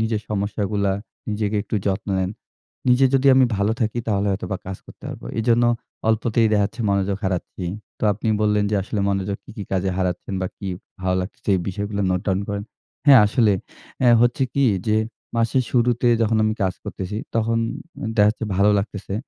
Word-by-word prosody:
নিজের 110 -1 0
সমস্যাগুলা, 100 -1 0 0.4
নিজেকে 105 0 -1
একটু 110 - -6
যত্ন 100 +1 -1
নেন। 95 0 0 0.6
নিজে 125 +2 +5
যদি 135 +1 +3
আমি 130 -1 +6
ভালো 100 +2 +1
থাকি 110 +1 0
তাহলে 100 -1 +1
হয়তোবা 95 0 -3
কাজ 95 -1 -4
করতে - - -14
পারব। - - -8 0.2
এজন্য 120 +1 +3 0.4
অল্পতেই 110 +1 +2
দেখা 105 -1 +4
যাচ্ছে, 115 +3 -10
মনোযোগ 100 0 +1
হারাচ্ছি। 90 0 -3 0.3
তো - - -2
আপনি 110 +3 -3
বললেন 105 -1 +2
যে 105 - +2
আসলে 105 +1 -3
মনোযোগ 100 0 -1
কি, - - -13
কি 105 - -4
কাজে 95 0 +1
হারাচ্ছেন 90 +1 -2
বা - - 0
কি 100 - -6 0.3
ভালো 95 0 0
লাগতেছে 95 - -9
এই - - -2
বিষয়গুলো 100 +1 -3
note 90 0 -1
down 95 +1 +1
করেন। 100 0 -3 0.4
হ্যাঁ 135 -4 +9
আসলে 105 0 +3 0.5
আ - - +5 0.2
হচ্ছে 120 +3 +2
কি 140 -1 +3 0.2
যে, 105 - +3 0.4
মাসের 115 +3 +2
শুরুতে 120 0 +3
যখন 110 0 +2
আমি 110 0 +1
কাজ 95 -1 +1
করতেছি, 95 +2 -5 0.2
তখন 115 +1 +1 0.6
দেখা 105 0 +6
যাচ্ছে 110 0 -5
ভালো 100 +1 +5
লাগতেছে। 100 -1 -4
105 Hz, 180 wpm, -22 LUFS, 100-115 Hz, 0.6 s, হ্যাঁ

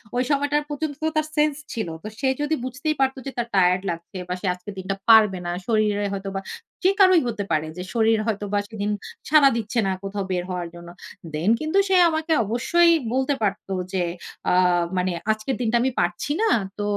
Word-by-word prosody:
ঐ - - 0
সময়টার 290 +1 +1
পর্যন্ত 295 0 -3
তো 315 - +2
তার 310 0 +1
sense 300 -1 +2
ছিল। 220 -5 -3 0.2
তো - - -6
সে 270 - 0
যদি 295 +2 +1
বুঝতেই 290 +5 -2
পারত 265 0 +2
যে 270 - -4
তার 235 -1 -1
tired 180 0 +4
লাগছে, 170 +3 -8
বা 180 - -2
সে - - -5
আজকের 180 +3 -9
দিনটা 190 +1 -3
পারবে 215 -4 +7
না। - - -2 0.2
শরীরে 210 -2 +1
হয়তো 195 0 -4
বা, - - 0 0.4
যে 370 - +5
কারোই 370 -3 +6
হতে 215 -3 -2
পারে, 155 -1 +1
যে 180 - -4
শরীর 225 -1 +3
হয়তো 205 -1 -1
বা 205 - +3
সেদিন 210 -1 -3 0.4
সাড়া 295 -2 +7
দিচ্ছে 230 +1 -2
না - - +1
কোথাও 200 0 -3
বের 180 -1 0
হওয়ার 180 -1 -3
জন্য। 170 0 -11 0.4
Then 160 +6 0
কিন্তু 310 +5 -1
সে 380 - +4
আমাকে 315 +1 0
অবশ্যই 335 - +3 0.2
বলতে 265 +2 +1
পারতো 200 -1 -2 0.2
যে 185 - +1 0.5
আ - - +3 0.5
মানে, 180 0 +1 0.2
"আজকের 215 +4 -2
দিনটা 235 -1 +1
আমি 260 +2 +1
পারছি 175 +11 -1
না। 450 - +3 0.3
তো 205 - -2
220 Hz, 200 wpm, -23 LUFS, 195-290 Hz, 0.5 s, পারবে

